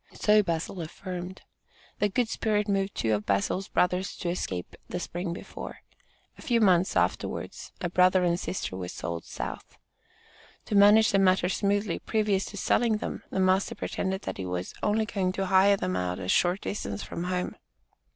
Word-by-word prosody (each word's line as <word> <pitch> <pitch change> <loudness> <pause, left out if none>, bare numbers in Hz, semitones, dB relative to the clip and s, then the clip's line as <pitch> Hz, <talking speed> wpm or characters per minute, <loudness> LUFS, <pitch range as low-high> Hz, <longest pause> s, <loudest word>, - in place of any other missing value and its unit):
So 210 0 +4
Bazil 170 0 -3
affirmed. 180 +2 -7 0.6
The 205 - +2
good 235 +4 +1
spirit 210 -1 0
moved 195 -1 0
two 110 -1 +1
of 105 0 -2
Bazil's 100 - 0
brothers 180 +1 0
to 175 - -3
escape 95 - -4
the 180 - -3
spring 175 0 -4
before. 170 - -8 0.6
A - - -10
few 235 -2 +2
months 185 -4 +4
afterwards - - -1
a 175 - 0
brother 185 +1 +4
and 175 0 +2
sister 185 - -3
were 90 -1 -4
sold 85 -1 -5
south. - - -7 0.9
To - - -5
manage 205 +2 +7
the 195 - +3
matter 185 -1 +3
smoothly, 200 -1 0
previous 210 -3 0
to 205 - -8
selling 225 +2 +2
them, - - -5
the - - -2
master 190 +1 +2
pretended 190 +1 -3
that - - -4
he 95 - -4
was 90 0 -4
"only 220 +1 +2
going 190 -4 -1
to 195 0 -1
hire 195 +1 +5
them 90 - -2
out 90 -1 -1
a 95 - -5
short 180 - +2
distance 100 - -4
from 170 - -5
home." 180 0 -2
185 Hz, 175 wpm, -28 LUFS, 170-200 Hz, 0.9 s, manage